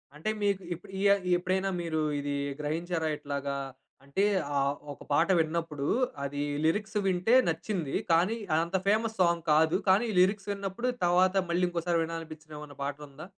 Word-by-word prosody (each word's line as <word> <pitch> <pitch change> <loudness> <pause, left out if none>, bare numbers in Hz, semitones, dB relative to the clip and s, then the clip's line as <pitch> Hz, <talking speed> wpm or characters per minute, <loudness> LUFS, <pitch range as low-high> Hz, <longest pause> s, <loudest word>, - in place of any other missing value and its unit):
అంటే 155 +8 -3
మీకు 200 -1 +1
ఇప్పు 175 +4 -11
ఇ - - -2
యా 200 - +7 0.2
ఎప్పుడైనా 185 +2 0
మీరు 160 -2 -1 0.2
ఇది 145 0 -2 0.2
గ్రహించారా? 160 +2 -2
ఇట్లాగా 140 -1 -3 0.5
అంటే 140 +8 -1 0.3
ఆహ్, 140 0 +2 0.2
ఒక - - -13
పాట 160 +4 +4
విన్నప్పుడు 160 -3 -1 0.4
అది 145 +1 -3 0.2
లిరిక్స్ 210 +6 0
వింటే 190 +5 +3
నచ్చింది. 165 -2 -3 0.2
కానీ, 175 +7 +3 0.2
అదంత 170 +4 +1
ఫేమస్ 220 +2 +2
సాంగ్ 170 -2 +2
కాదు. 160 +3 +4
కానీ, 190 +4 +5
ఈ - - -4
లిరిక్స్ 195 +2 +2
విన్నప్పుడు 200 +4 -3 0.2
తర్వాత 180 +2 +3
మళ్ళీ 175 +1 +1
ఇంకోసారి 170 0 0
వినాలనిపించిన 160 -1 -7
ఏమన్నా 150 -2 -10
పాటుందా? 145 +1 -6
170 Hz, 150 wpm, -29 LUFS, 150-190 Hz, 0.5 s, యా